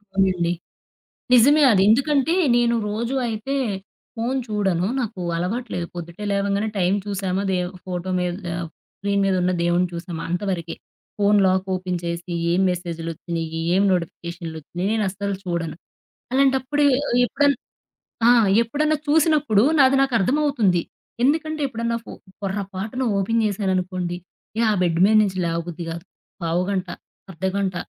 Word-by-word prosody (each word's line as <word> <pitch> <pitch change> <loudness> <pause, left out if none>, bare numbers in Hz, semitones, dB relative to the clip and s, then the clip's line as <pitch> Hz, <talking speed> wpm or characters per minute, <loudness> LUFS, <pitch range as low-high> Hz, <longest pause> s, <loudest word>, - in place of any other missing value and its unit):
అవునండి. 185 -3 +2 0.8
నిజమే 285 +6 +6
అది. 190 -3 +4
ఎందుకంటే 280 +6 +3 0.2
నేను 235 -1 +3
రోజు 230 +5 -2
అయితే 225 +5 -3 0.6
ఫోను 245 +4 -1
చూడను. 190 -4 0
నాకు 215 -6 -4 0.2
అలవాటు 220 +8 -2
లేదు. 175 -1 -2
పొద్దుటే 170 +4 -7
లేవగానే 200 +2 0
టైం 180 +1 +2
చూసామా, 195 -1 -1
దే 185 - +1 0.3
ఫోటో 180 0 -4
మీద 180 0 -1 0.3
ఆహ్, 170 -2 -4 0.3
స్క్రీన్ 200 0 0
మీద 195 - +2
ఉన్న 180 - +2
దేవుణ్ని 175 +1 +2
చూసామా, 170 -1 -5
అంతవరకే. 175 -3 -2 0.4
ఫోను 205 0 +4
లాక్ 185 0 +1
ఓపెన్ 180 -1 -2
చేసి 170 +1 -4 0.2
ఏం 175 +2 +2
మెసేజులొచ్చినయ్యి, 165 -1 -4
ఏం 195 - +4
నోటిఫికేషనులొచ్చినయి 170 0 -4
నేను 220 -1 +1
అస్సలు 200 +1 -3
చూడను. 170 -3 -3 0.6
అలాంటప్పుడు 270 +2 +2
ఎ 255 - +3 0.3
ఎప్పుడన్నా 285 +1 +2 0.7
ఆ! - - +8 0.3
ఎప్పుడన్నా 300 +6 0
చూసినప్పుడు 295 -8 +3 0.2
నాది 270 -1 +6
నాకు 270 -2 +1
అర్థమవుతుంది. 235 - +2 0.4
ఎందుకంటే 310 +3 +1
ఎప్పుడన్నా 235 -2 -2
ఫో - - -8 0.3
పొరపాటున 195 +4 -3 0.2
ఓపెన్ 225 +4 +1
చేశాననుకోండి, 185 -3 -1 0.4
ఇక 230 - +1
ఆ - - +3
బెడ్ 170 -2 +1
మీద 215 +2 +4
నుంచి 190 -2 -1
లేవబుద్ధి 170 0 -3
కాదు. 170 +1 -6 0.4
పావుగంట, 185 +3 -1 0.4
అర్ధగంట, 190 +2 -2
195 Hz, 130 wpm, -22 LUFS, 175-235 Hz, 0.8 s, ఆ